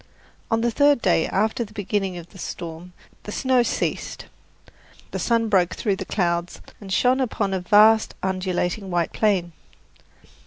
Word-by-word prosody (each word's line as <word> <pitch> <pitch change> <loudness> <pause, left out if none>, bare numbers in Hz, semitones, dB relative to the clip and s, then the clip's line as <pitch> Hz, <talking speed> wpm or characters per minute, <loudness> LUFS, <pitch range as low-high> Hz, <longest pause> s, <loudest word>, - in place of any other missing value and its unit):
On 225 0 +1
the 235 0 +1
third 285 +3 +4
day 175 -6 +2
after 220 +5 0
the 210 -2 -12
beginning 195 -2 -2
of 170 0 -10
the 190 - -14
storm 170 +1 -7 0.3
the 210 - -8
snow 255 +2 +2
ceased. 235 - -2 0.9
The - - -3
sun 230 -1 +1
broke 185 -4 +2
through 200 -4 -1
the - - -5
clouds 175 -2 -1 0.2
and 195 -2 -9
shone 250 +6 +3
upon 210 -5 -1
a 190 - 0
vast, 215 +4 +4
undulating 185 +1 -2
white 175 -2 -1
plain. 190 -5 +1
200 Hz, 155 wpm, -23 LUFS, 180-225 Hz, 0.9 s, third